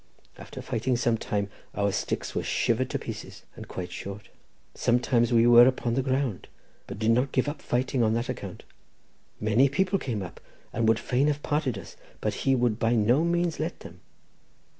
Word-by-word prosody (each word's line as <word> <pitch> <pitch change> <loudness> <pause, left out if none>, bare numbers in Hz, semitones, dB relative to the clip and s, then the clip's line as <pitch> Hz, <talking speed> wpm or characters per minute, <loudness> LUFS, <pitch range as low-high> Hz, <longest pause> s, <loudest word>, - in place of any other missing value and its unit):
After - - -9
fighting 120 +3 -1
for 120 - -2
some 115 -2 +2
time, 100 -1 -1 0.3
our 100 0 +1
sticks - - -3
were - - -1
shivered 125 +2 0
to - - -1
pieces - - -8
and - - -9
quite 90 -1 -6
short; 100 +1 -7 0.4
sometimes 120 -1 +2
we 115 -1 +5
were 120 0 +8
upon 125 -2 0
the 135 - +1
ground, 130 - -1 0.4
but - - -7
did 110 +2 +2
not 125 +4 +2
give 130 +1 +1
up 145 0 -4
fighting 125 +1 0
on 110 -1 +2
that 120 +2 -1
account. 110 -8 -6 0.8
Many 110 +6 +3
people 185 +7 +1
came 115 - -3
up 90 -1 -9 0.3
and 115 - +1
would 110 0 +4
fain 130 +5 +1
have 145 0 -1
parted 145 -7 0
us, 95 - -10 0.2
but - - -3
we 135 - +5
would 120 -3 +1
by 115 +1 +2
no 120 +7 +3
means 170 -1 0
let - - -3
them. - - -11
120 Hz, 190 wpm, -27 LUFS, 110-135 Hz, 0.8 s, were